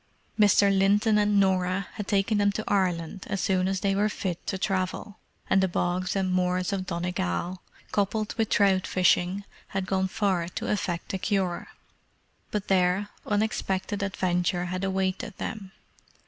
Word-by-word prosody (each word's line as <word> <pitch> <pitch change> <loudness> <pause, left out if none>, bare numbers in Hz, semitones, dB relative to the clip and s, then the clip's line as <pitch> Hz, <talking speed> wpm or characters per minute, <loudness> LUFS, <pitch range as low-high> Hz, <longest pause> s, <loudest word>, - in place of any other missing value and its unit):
Mr. 200 -1 +5
Linton 205 +3 +3
and 205 -1 +3
Norah 185 -1 +1
had 210 -2 -5
taken 205 +1 +2
them 205 0 +3
to 215 - -3
Ireland 185 -2 -1
as 200 -2 -1
soon 185 0 +1
as 190 -1 -1
they 195 -1 +1
were 205 +2 +2
fit 185 -4 -4
to 190 - -1
travel; 190 +1 -2 0.3
and 190 - +4
the 190 - +3
bogs 180 +1 -1
and 190 -1 0
moors 180 +1 +1
of 190 -1 -3
Donegal, 175 - -2 0.3
coupled 210 +1 0
with 225 -2 -1
trout 190 -2 +3
fishing, 185 +1 +2 0.2
had 195 -1 -3
gone 190 0 0
far 185 -3 0
to 175 - -4
effect 185 -5 -2
a 190 - -1
cure. 190 -4 -1 0.8
But 210 -2 -3
there, 190 +2 +2 0.2
unexpected 205 -1 -1
adventure 180 -2 0
had 185 +1 -3
awaited 190 +3 -1
them. 200 -3 -5
190 Hz, 155 wpm, -27 LUFS, 185-205 Hz, 0.8 s, Mr